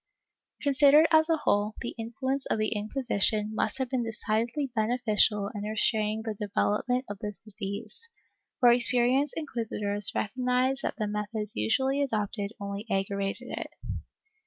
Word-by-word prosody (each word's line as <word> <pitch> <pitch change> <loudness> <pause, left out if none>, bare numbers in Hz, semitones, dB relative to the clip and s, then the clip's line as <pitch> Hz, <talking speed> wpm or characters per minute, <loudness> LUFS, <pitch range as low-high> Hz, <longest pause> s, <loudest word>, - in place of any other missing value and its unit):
^ - - -10
Considered 285 +2 +6
as 315 0 +5
a 325 - +3
whole, 210 -6 +1
the 235 - -4
influence 260 +4 -3
of - - 0
the 215 0 +1
Inquisition 215 -1 +1
must - - +1
have 260 -1 -1
been 255 0 -1
decidedly 230 +4 -1
beneficial 215 -3 +2
in 205 - -5
restraining 215 0 0
the 220 -1 -3
development 210 +5 0
of 205 -1 -7
this 210 -2 -5
disease, 215 - -6 0.5
for 245 - +7
experienced 250 +3 +3
inquisitors 210 -8 -2
recognized 255 +3 0
that - - -2
the 215 - -1
methods 210 0 -2
usually 265 - +1
adopted 210 -5 -1
only 200 +2 -5
aggravated 200 +4 -2
it. - - -4
220 Hz, 140 wpm, -28 LUFS, 210-255 Hz, 0.5 s, for